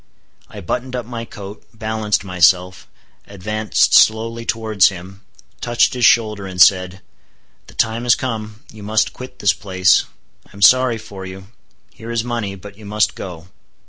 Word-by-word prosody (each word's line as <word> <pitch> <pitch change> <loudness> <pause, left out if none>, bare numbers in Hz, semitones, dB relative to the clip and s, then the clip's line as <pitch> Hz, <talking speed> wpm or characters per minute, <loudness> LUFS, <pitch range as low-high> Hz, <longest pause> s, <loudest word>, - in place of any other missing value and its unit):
I 105 - -10
buttoned 125 +8 -4
up 120 -2 -4
my 115 -1 -6
coat, 100 -2 -10
balanced 110 -2 -1
myself; 90 0 +2 0.4
advanced 105 +2 0
slowly 115 +1 +3
towards 110 -4 +2
him, 95 +1 -11 0.4
touched 120 -1 +2
his 125 -2 +1
shoulder, 105 -3 +2
and 90 -1 -8
said, 90 +1 +4 0.7
"The - - -16
time 115 +1 0
has 120 - +5
come; 110 -3 -5
you 110 - -12
must 110 +1 0
quit 125 0 -10
this 100 - +2
place; 95 -3 +2 0.4
I - - -27
am 100 - -3
sorry 130 -1 +5
for 100 -3 -10
you; 95 +1 -10 0.4
here 115 +2 -11
is 115 -1 -1
money; 115 -5 -4
but 100 +2 -13
you 110 - -12
must 105 +1 +1
go." 90 -2 -9
105 Hz, 160 wpm, -18 LUFS, 95-115 Hz, 0.7 s, has